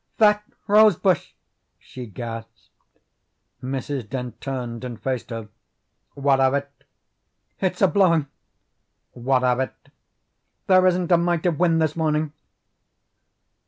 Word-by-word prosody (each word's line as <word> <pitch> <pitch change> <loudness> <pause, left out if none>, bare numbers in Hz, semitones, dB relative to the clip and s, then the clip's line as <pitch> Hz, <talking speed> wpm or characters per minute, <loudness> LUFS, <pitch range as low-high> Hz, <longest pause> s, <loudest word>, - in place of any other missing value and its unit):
"That 210 -1 +4 0.2
rose 215 +1 +6
bush!" 185 -5 0 0.4
she 125 -2 -10
gasped. 115 +1 -8 0.9
Mrs. 130 -2 -4
Dent 125 -2 -6
turned 125 -3 -5
and 120 -3 -6
faced 130 -3 -3
her. 115 -2 -6 0.7
"What 140 -1 +2
of 135 +1 +3
it?" 140 0 -3 0.9
"It's 185 0 -1
a - - +7
blowing." 175 -6 +3 0.9
"What 125 +1 0
of 125 0 +2
it?" 130 - -2 0.9
"There 185 -1 +5
isn't 180 -1 +1
a 175 - +7
mite 170 -1 0
of 170 -3 +1
wind 170 -2 +3
this 155 -1 -1
morning." 155 -2 0
140 Hz, 125 wpm, -23 LUFS, 125-175 Hz, 0.9 s, a